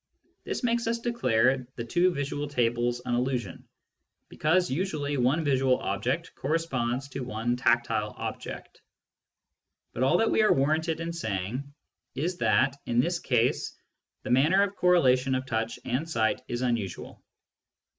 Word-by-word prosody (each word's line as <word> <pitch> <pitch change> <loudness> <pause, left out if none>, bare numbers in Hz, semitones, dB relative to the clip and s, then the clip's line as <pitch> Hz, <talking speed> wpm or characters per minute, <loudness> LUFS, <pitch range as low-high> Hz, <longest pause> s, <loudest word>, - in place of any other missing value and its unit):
This - - -3
makes 235 -1 +1
us 230 +1 +1
declare 130 - +1
the 115 - -4
two 175 +10 +2
visual 145 -1 -3
tables 120 -2 0
an 125 - -1
illusion, 120 -6 -2 0.6
because 180 +4 +2
usually 150 -2 -1
one 130 +6 +2
visual 135 -3 +2
object - - -2
corresponds 135 -4 -1
to 135 - -6
one 120 -1 -2
tactile 120 -3 +1
object. - - -7 1.1
But - - -4
all 135 +7 +4
that 225 - +2
we - - +3
are 215 - +4
warranted 160 +4 0
in 165 0 -3
saying 120 - -3 0.4
is 170 +7 -2
that, 135 +1 +2
in 120 0 +1
this 170 +7 +1
case, 125 -4 0 0.5
the - - -4
manner 155 +10 +4
of 200 0 -2
correlation 135 -7 +3
of 130 0 -2
touch 115 -2 -2
and 130 +7 -2
sight 110 -7 +1
is 120 +1 -3
unusual. 115 -8 -3
130 Hz, 145 wpm, -27 LUFS, 120-165 Hz, 1.1 s, all